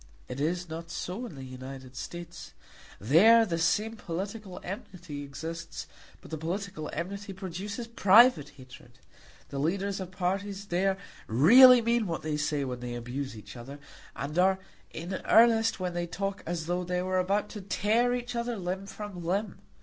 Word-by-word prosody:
It 125 +1 -6
is 175 +4 -1
not 165 +1 -7
so 190 +8 -4
in 170 - -11
the 135 - -8
United 130 0 -9
States. 175 +5 -8 0.5
There 215 - +6
the 170 -5 -2
same 215 +7 +1
political 195 +2 -5
enmity 180 - -7
exists, 160 +4 -6 0.4
but - - -14
the 160 - -4
political 175 -1 -4
enmity 195 +4 -5
produces 195 +4 -5
private 230 - +5
hatred. 130 -2 -14 0.5
The 140 - -4
leaders 195 +6 -1
of 185 -2 -5
parties 195 +2 -2
there 190 +1 +1 0.3
really 240 - +8
mean 235 -2 +2
what 165 -2 -3
they 155 -1 -1
say 150 -1 0
when 125 -2 -4
they 120 0 -5
abuse 125 +1 -5
each 105 - -11
other, 130 +4 -9 0.4
and 150 +5 -3
are 190 +1 +4 0.3
in 175 +3 -5
earnest 225 -1 +5
when 180 -1 -2
they 175 0 -2
talk 195 +3 -3
as 170 -2 -2
though 175 +2 -1
they 180 0 -1
were 185 0 +1
about 200 +3 +1
to 210 - -7
tear 225 +5 +1
each 245 0 -5
other 235 0 -2
limb 190 +1 -4
from 200 -4 -7
limb. 195 +5 -2
180 Hz, 165 wpm, -29 LUFS, 155-205 Hz, 0.5 s, really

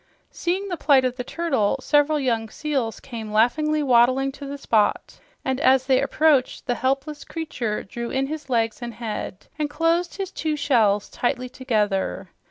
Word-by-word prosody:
Seeing 370 +3 -2
the 355 -3 -3
plight 275 -4 +4
of 250 -1 -1
the 250 - -4
turtle, 265 -9 0
several 295 +1 +2
young 230 -5 0
seals 265 -5 -2
came 225 -4 -7
laughingly 300 +8 +2
wabbling 255 +1 +4
to 280 +1 -9
the 285 +1 -5
spot, 220 -6 0 0.3
and 260 0 0
as 260 -2 +4
they 260 -1 +3
approached 280 -1 +2
the 245 - +1
helpless 275 +4 -2
creature 255 -10 -4
drew 235 +4 -6
in 270 +1 0
his 300 0 -6
legs 230 -2 0
and 235 -2 -6
head 215 -4 -5
and 300 -1 0
closed 330 +3 0
his 390 -1 -4
two 310 -4 -2
shells 220 -8 +2
tightly 250 0 -2
together. 210 -8 -1
265 Hz, 170 wpm, -23 LUFS, 235-300 Hz, 0.3 s, plight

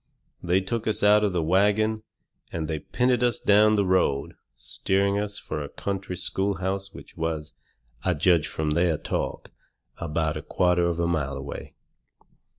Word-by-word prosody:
They 90 +2 +2
took 115 +4 -3
us 110 - 0
out 105 +1 +6
of 105 - +2
the 85 -2 0
wagon, 105 +5 +2 0.5
and 80 -2 -3
they 80 -1 -2
pinted 125 - +1
us 120 -1 +2
down 105 +1 +5
the 100 -1 +2
road, 90 -7 +1 0.2
steering 95 +10 +1
us 105 0 -3
fur 75 - -4
a 70 - -6
country 95 -2 -4
schoolhouse 95 +1 -1
which - - -13
was, 80 -2 -3 0.5
I 90 -2 +1
judged 85 -1 +3
from 75 +1 -2
their 85 0 +2
talk, - - -4 0.5
about 80 -1 -1
a - - -5
quarter 90 0 +2
of 85 -1 -1
a 85 - +1
mile 75 -5 -1
away. 70 +1 -7
90 Hz, 160 wpm, -26 LUFS, 80-100 Hz, 0.5 s, out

